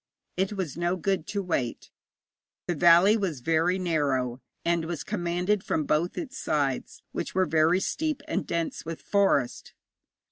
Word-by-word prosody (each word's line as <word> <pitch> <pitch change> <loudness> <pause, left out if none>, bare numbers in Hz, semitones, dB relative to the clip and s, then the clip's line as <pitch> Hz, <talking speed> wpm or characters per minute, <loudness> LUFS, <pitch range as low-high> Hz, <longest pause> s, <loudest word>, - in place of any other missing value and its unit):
It 190 +2 0
was 180 -8 -4
no 175 +1 +1
good 190 -2 -1
to 205 -1 -2
wait. 135 -10 -2 0.7
The 175 - 0
valley 175 +5 +6
was 185 - -2
very 165 +5 +2
narrow, 140 -8 0 0.2
and 170 -1 +1
was 165 -3 -4
commanded 180 +1 -1
from 155 - 0
both 155 +4 0
its 270 -5 -5
sides, 140 -4 -1
which - - -4
were 185 0 +3
very 165 +2 +3
steep 305 +6 -2
and 315 - -2
dense 170 -1 -2
with 165 0 -6
forest. 195 -11 +1
170 Hz, 150 wpm, -27 LUFS, 155-190 Hz, 0.7 s, valley